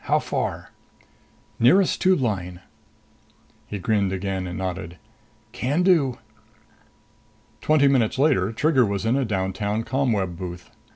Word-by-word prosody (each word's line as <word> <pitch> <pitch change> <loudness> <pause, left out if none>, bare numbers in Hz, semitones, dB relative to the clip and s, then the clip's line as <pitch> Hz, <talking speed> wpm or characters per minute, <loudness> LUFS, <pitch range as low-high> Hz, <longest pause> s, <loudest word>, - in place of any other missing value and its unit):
How - - +3
far?" - - -3 0.9
"Nearest 180 +11 +4
tube 185 -5 +3
line." 90 -6 -3 1.1
He 105 - -5
grinned 100 0 0
again 95 -1 -3
and 90 - -6
nodded. 90 -2 -5 0.5
"Can 130 +8 -1
do." 160 -9 +3 1.4
Twenty 150 -2 +3
minutes 130 -5 +2
later 130 -9 +2
Trigger 135 +3 +2
was 100 -2 -2
in 115 +3 +2
a 135 -1 +1
downtown 100 +1 -2
ComWeb 115 -9 -1
booth. 90 -1 -8
110 Hz, 120 wpm, -23 LUFS, 95-135 Hz, 1.4 s, Nearest